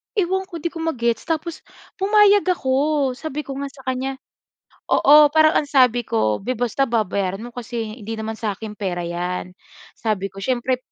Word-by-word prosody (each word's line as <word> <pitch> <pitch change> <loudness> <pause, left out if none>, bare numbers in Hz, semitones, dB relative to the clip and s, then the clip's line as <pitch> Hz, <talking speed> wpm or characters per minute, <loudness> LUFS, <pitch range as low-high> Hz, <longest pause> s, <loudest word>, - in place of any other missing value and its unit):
ewan 380 -1 0
ko 340 -5 -8
'di 340 - -1
ko 330 - -8
ma-gets 235 -8 -1
tapos 325 0 -2 0.4
pumayag 410 0 +5
ako. 285 -3 +1
Sabi 300 +3 -5
ko 280 - -8
nga 280 - -3
sa 270 -1 -15
kanya 260 +1 -2 0.7
oo, 300 +1 +7
parang 315 0 +5
ang 295 - -1
sabi 250 -4 +3
ko, 110 -1 +1
“Beh 250 +6 -2
basta 245 +3 0
babayaran 200 -3 -1
mo 240 - -7
kasi 230 -2 -5
hindi 220 +2 -5
naman 220 0 -5
sa 215 -3 -2
akin 215 0 -7
pera 180 -4 -2
'yan.” 175 +1 -3 0.5
Sabi 210 -3 -2
ko, 195 - -13
“Siyempre, 250 +4 0
255 Hz, 175 wpm, -21 LUFS, 215-305 Hz, 0.7 s, oo